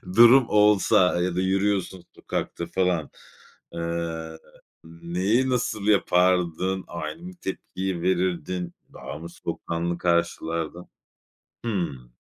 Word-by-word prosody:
durum 120 +2 +8
olsa, 105 -3 +4
ya 90 -1 -1
da - - 0
yürüyorsun 95 -1 0
sokakta 85 - -4
falan. 90 -3 0 0.6
Eee, 85 -1 -4 0.5
neyi, 90 +10 0
nasıl 110 -4 -1
yapardın? 90 -2 +2
Aynı 85 - -6
mı 180 - -7
tepkiyi 95 -2 -4
verirdin? 90 -1 -1 0.2
Daha 75 - -7
mı 85 +1 -8
soğukkanlı 85 0 -3
karşılardın? 85 -1 -1 0.8
Hımm. 75 - -3
90 Hz, 100 wpm, -25 LUFS, 85-95 Hz, 0.8 s, durum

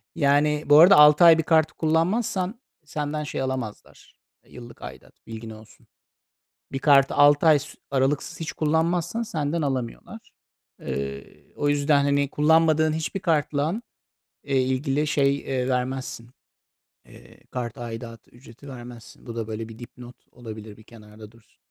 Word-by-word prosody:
Yani, 150 +1 +2
bu 145 +1 +6
arada 175 +2 +8
6 150 +2 +7
ay 165 -1 +8
bir 160 - 0
kartı 160 -1 +2
kullanmazsan 185 +6 -1 0.3
senden 150 0 -4
şey 145 - -5
alamazlar, 130 -5 -6 0.3
yıllık 120 -1 -13
aidat. 65 0 -13
Bilgin 115 0 -8
olsun. 110 0 -15 0.9
Bir 135 - -2
kartı 140 -1 +4
6 145 +2 +4
ay 155 -2 +6
s - - -9 0.2
aralıksız 135 +4 -1
hiç 160 - -4
kullanmazsan 165 +7 -1
senden 155 -5 -3
alamıyorlar. 130 -4 -5 0.5
Eee, 70 0 -5 0.3
o 145 - -1
yüzden 145 0 +2
hani, 140 0 +1
kullanmadığın 155 0 +3
hiçbir 160 +4 -4
kartla, 155 +5 -1 0.6
eee, 135 -2 +1
ilgili 135 +3 -1
şey, 140 -1 +1
eee, 130 -2 -3
vermezsin, 125 -2 -3 0.7
eee, - - -18
kart 120 -2 -5
aidatı, 115 -1 -8
ücreti 120 +3 -16
vermezsin. 120 -3 -12
Bu 115 0 -8
da 115 -2 -3
böyle 110 +1 -5
bir 115 - -12
dipnot 120 0 -12 0.2
olabilir, 110 -3 -10
bir 110 - -18
kenarda 110 -1 -15
dursun. 115 -1 -25
140 Hz, 140 wpm, -24 LUFS, 120-155 Hz, 0.9 s, arada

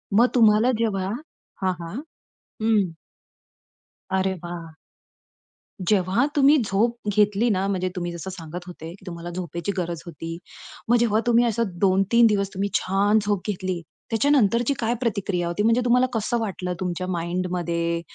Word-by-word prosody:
मग 240 +3 +6
तुम्हाला 225 +1 +5
जेव्हा 195 -4 0 0.5
हां, 185 -1 +1
हां. 170 +4 -7 0.7
हं. 210 -6 +2 1.2
अरे 190 0 +1
वाह! 170 -2 -7 1.1
जेव्हा 195 +5 +2
तुम्ही 285 +1 +6
झोप 225 +5 +1 0.2
घेतली 210 +2 +3
ना, 195 -2 +1
म्हणजे 185 -2 -1
तुम्ही 175 -1 -3
जसं 170 +2 -6
सांगत 175 -1 -7
होते, 165 -2 -8
की 190 +1 -17
तुम्हाला 170 0 -6
झोपेची 175 +1 -4
गरज 170 -3 -2
होती. 165 -1 -6 0.5
मग 240 - +6
जेव्हा 225 -2 +2
तुम्ही 240 0 +5
असं 235 0 +1 0.2
2-3 195 +4 +4
दिवस 200 -2 +1
तुम्ही 200 +2 -1
छान 200 +3 +2
झोप 205 -3 0
घेतली, 185 -3 -2 0.3
त्याच्यानंतरची 240 0 +3
काय 230 0 +1
प्रतिक्रिया 195 -6 -1
होती? 175 +5 -1
म्हणजे 230 +2 +3
तुम्हाला 250 +1 +4
कसं 225 +2 0
वाटलं 185 -4 -3
तुमच्या 185 0 -3
माइंडमध्ये, 170 -1 -1
195 Hz, 140 wpm, -24 LUFS, 175-225 Hz, 1.2 s, मग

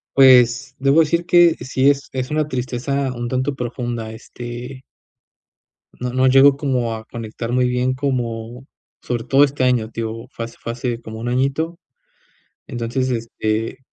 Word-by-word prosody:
Pues, 130 0 +5
debo 140 +4 +4
decir 170 +2 +1
que 175 -2 +6
sí, 130 +1 +2
es 140 -1 0
es 130 +1 -4
una 155 -1 0
tristeza 130 +1 -2
un 120 0 -4
tanto 130 +2 -1
profunda, 120 -2 -4
este 120 +3 -8 1.1
no 125 0 -4
no 130 0 +3
llego 135 +1 +6
como 125 -5 -1
a 110 0 -9
conectar 115 0 -6
muy 125 0 +2
bien 125 +1 0
como 125 -2 -3 0.4
sobre 120 -2 -3
todo 140 +1 +4
este 140 -2 0
año, 120 -4 +2
te 115 0 -5
digo, 115 +2 -5
fue 115 - -5
hace 115 - -13
fue 115 - -4
hace 120 -1 -3
como 110 -1 -8
1 120 +1 -3
añito. 140 +7 -1 0.9
Entonces, 120 +1 -2
este, 115 0 -2
125 Hz, 160 wpm, -20 LUFS, 120-135 Hz, 1.1 s, que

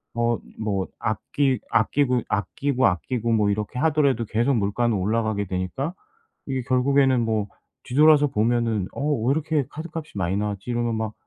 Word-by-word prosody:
어 120 0 +1 0.2
뭐 100 -4 -1
아끼 130 +5 0
아끼고, 125 +2 +2
아끼고, 130 +7 0
아끼고 115 +6 -1
뭐 105 -2 +3
이렇게 105 +4 -3
하더라도 140 -6 +2
계속 120 +6 +1
물가는 110 +2 +1
올라가게 110 +1 0
되니까 95 - -3 0.5
이게 130 -2 -1
결국에는 130 0 +3
뭐 110 -2 0 0.4
뒤돌아서 150 +2 +5
보면은 115 -5 0
'어 - - -7 0.3
왜 - - +4
이렇게 155 -1 0
카드값이 160 -5 -7
많이 95 0 0
나왔지?' 100 +1 -3
이러면 120 -1 0
막 110 -1 -3
120 Hz, 345 characters per minute, -24 LUFS, 105-135 Hz, 0.5 s, 뒤돌아서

